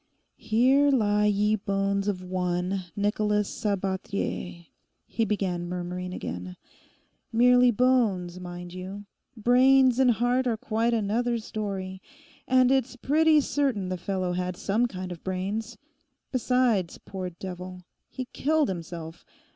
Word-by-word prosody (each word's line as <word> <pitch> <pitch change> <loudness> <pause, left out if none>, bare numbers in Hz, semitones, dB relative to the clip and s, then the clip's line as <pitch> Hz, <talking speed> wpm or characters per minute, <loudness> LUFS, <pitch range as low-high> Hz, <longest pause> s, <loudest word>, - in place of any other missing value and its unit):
'"Here 260 +6 +3
lie 210 -5 +3
ye 210 +1 +2
bones 200 -1 -1
of 185 -3 -2
one, 180 +1 -2
Nicholas 210 0 +1
Sabathier,"' 190 -3 -3 0.4
he 225 - -1
began 185 -4 -2
murmuring 180 0 -4
again—'merely 230 - 0
bones, 215 -7 +1
mind 175 -1 -8
you; 190 +3 -7 0.3
brains 255 +2 +5
and 260 -1 +5
heart 245 +2 +2
are 230 -2 0
quite 225 +2 0
another 230 +3 0
story. 195 -4 -5 0.5
And 255 0 +4
it's 265 -1 +1
pretty 305 +4 +3
certain 265 -10 -1
the 185 - -1
fellow 185 -1 -2
had 180 0 -3
some 220 +5 +1
kind 185 -4 -6
of 170 - -8
brains. 200 +5 -3 0.5
Besides, 245 -7 +1
poor 185 -2 -6
devil! 180 +1 -8 0.3
he 255 - -5
killed 305 0 +1
himself. 170 -2 -6
205 Hz, 120 wpm, -27 LUFS, 185-245 Hz, 0.5 s, brains